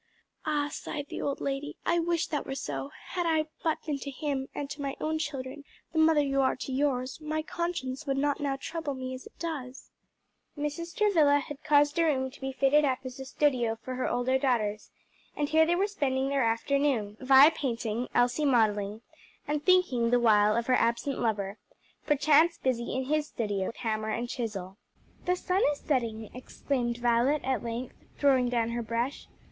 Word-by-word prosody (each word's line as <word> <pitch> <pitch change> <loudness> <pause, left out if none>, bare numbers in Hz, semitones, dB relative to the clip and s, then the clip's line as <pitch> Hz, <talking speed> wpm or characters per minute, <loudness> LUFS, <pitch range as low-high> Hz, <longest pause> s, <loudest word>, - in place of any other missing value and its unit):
"Ah!" 295 -1 +1
sighed 290 - -5
the - - -5
old 280 - -2
lady, 275 +1 -3
"I 340 0 +2
wish 335 -1 +1
that 295 - -1
were 270 - -3
so: 140 - -4 0.2
had 355 -2 -1
I 315 -1 +2 0.2
but 320 -2 -1
been 295 -3 -2
to 280 - -6
him, 275 -1 -3
and 285 - -3
to 300 -1 -6
my 275 -1 -3
own 315 0 -1
children, 285 -2 -5 0.3
the 320 - +1
mother 315 -2 +5
you 275 -1 +1
are 265 - +2
to 260 - -6
yours, 260 0 -1
my 310 0 -2
conscience 310 -5 -3
would 270 0 0
not 285 +1 +1
now 280 -2 -1
trouble 300 0 -4
me 260 0 -5
as 255 - -8
it - - -19
does." 275 -6 -6 0.7
Mrs. 295 +4 -4
Travilla 325 -9 +4
had 290 0 -6
caused 290 +1 +3
a - - +5
room 265 -4 +1
to 275 - -16
be 270 0 -3
fitted 275 +3 +3
up 265 -3 +2
as 255 0 -8
a 265 - -6
studio 255 -5 +1
for 255 - -5
her 255 0 -1
older 245 +2 +1
daughters, 220 -6 0 0.5
and 290 -1 0
here 320 +1 +4
they 345 - +3
were 380 +3 +2
spending 270 -9 -1
their 280 -1 +1
afternoon 230 -2 +1
Vi 270 +3 +7
painting, 235 -4 -2
Elsie 245 +4 +2
modelling 215 -5 +2 0.4
and 295 0 -1
thinking, 350 -11 +3
the 245 +1 +4
while, 215 -2 +4
of 235 - 0
her 255 - +2
absent 235 +3 +1
lover, 205 -3 -1 0.5
perchance 300 +3 +4
busy 240 -2 -1
in 260 - 0
his 300 +2 0
studio 205 -7 -2
with - - -6
hammer 220 -2 -2
and 235 +2 -2
chisel. 200 -6 -5 0.5
"The 360 - +2
sun 365 +2 0
is 285 - -11
setting," 230 -6 -1
exclaimed 250 -1 -3
Violet 240 +4 +2
at 265 -1 0
length, 235 +2 -5 0.2
throwing 260 -3 +3
down 235 -2 0
her 235 0 -2
brush. 235 +4 -3
270 Hz, 190 wpm, -29 LUFS, 240-295 Hz, 0.7 s, Vi